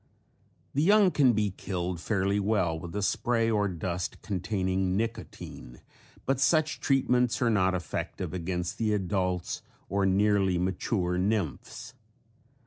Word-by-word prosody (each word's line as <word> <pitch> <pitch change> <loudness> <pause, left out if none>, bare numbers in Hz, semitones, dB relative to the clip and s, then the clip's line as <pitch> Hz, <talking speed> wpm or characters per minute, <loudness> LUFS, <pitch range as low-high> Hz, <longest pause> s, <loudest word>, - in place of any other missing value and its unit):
The 140 - +1
young 200 +2 +5
can 135 -6 +4
be 105 -2 +1
killed 90 -2 -4
fairly 100 0 +1
well 95 -6 +1
with 85 +3 -8
a 105 - -1
spray 115 +2 +1
or 105 -2 +2
dust 90 0 -3
containing 95 -1 -1
nicotine 110 - -5 0.5
but 135 -1 +1
such 155 +2 +2
treatments 125 -3 +2
are 120 -2 +2
not 95 -3 +2
effective 85 0 -4
against 90 +1 -3
the 110 -2 +1
adults 90 -2 -1 0.3
or 100 -1 +1
nearly 95 -1 +3
mature 90 0 -1
nymphs. 95 - -2
100 Hz, 130 wpm, -28 LUFS, 90-115 Hz, 0.5 s, young